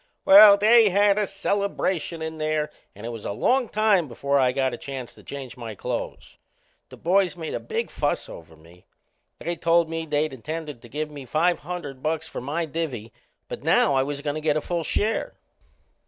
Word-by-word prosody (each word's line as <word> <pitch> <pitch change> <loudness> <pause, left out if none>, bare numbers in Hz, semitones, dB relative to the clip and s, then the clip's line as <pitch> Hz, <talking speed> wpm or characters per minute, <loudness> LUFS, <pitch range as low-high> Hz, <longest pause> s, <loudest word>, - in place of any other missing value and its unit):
Well, 200 +1 +9
they 220 +1 +6
had 200 +2 +3
a 210 - 0
celebration 195 -4 -2
in 160 0 -6
there 155 -1 -1 0.2
and 105 +3 -10
it - - -4
was 115 -2 -7
a - - -3
long 250 - +1
time 210 -6 +2
before 140 +3 0
I 130 -1 +3
got 130 -1 0
a - - -4
chance 135 -3 -7
to - - -17
change 135 -3 -8
my 115 -3 -7
clothes. - - -6 0.5
The - - -12
boys 185 +1 +2
made 160 -2 -6
a - - -2
big 460 +1 -4
fuss - - -1
over 80 -1 -12
me. 85 +3 -20 0.5
They 170 +2 -4
told 165 -1 +2
me 165 0 -4
they'd 150 0 0
intended 150 0 -6
to 120 - -14
give 150 +4 -4
me 145 -2 -9
five 165 +7 +1
hundred 150 -5 -7
bucks 160 +2 -2
for - - -6
my 150 +6 -2
divvy, 140 -8 -5 0.3
but - - -7
now 140 - +3
I 135 - +3
was 140 +1 -3
goin' 145 0 -2
to 155 - -5
get 155 -1 +1
a - - +2
full 170 0 -2
share. 215 +7 -1
155 Hz, 200 wpm, -24 LUFS, 135-180 Hz, 0.5 s, Well